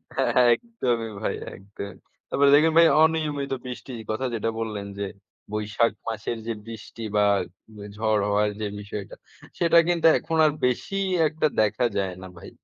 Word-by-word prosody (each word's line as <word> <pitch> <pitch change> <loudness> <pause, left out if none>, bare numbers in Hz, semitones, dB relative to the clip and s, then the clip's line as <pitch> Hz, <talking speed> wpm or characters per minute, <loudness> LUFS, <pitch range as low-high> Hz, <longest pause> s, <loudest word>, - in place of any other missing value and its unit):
হ্যা, - - +1
হ্যা। 125 - +6
একদমই 120 - -2
ভাই - - -1 0.2
একদমই। 100 0 -9 0.3
তারপরে 140 0 +4
দেখুন 160 +2 +4
ভাই 165 0 +8 0.2
অনিয়মিত 150 -4 0
বৃষ্টির 125 -1 -7
কথা 130 +5 -2
যেটা 115 0 -1
বললেন 105 -3 -4
যে 100 - -1 0.5
বৈশাখ 105 +2 +1 0.2
মাসের 115 +1 -3
যে 115 - -1
বৃষ্টি, 115 0 -9
বা 105 0 +4 0.7
ঝড় 110 -2 +1
হওয়ার 105 +1 +2
যে 105 - -1
বিষয়টা 100 -1 -7 0.4
সেটা 170 0 +4
কিন্তু 170 -2 +3
এখন 165 - -3
আর 150 - +4
বেশিই 195 +10 -1 0.2
একটা 155 0 0
দেখা 110 +3 +1
যায় 95 -2 -1
না - - -7
ভাই। - - -10
115 Hz, 155 wpm, -25 LUFS, 105-155 Hz, 0.7 s, ভাই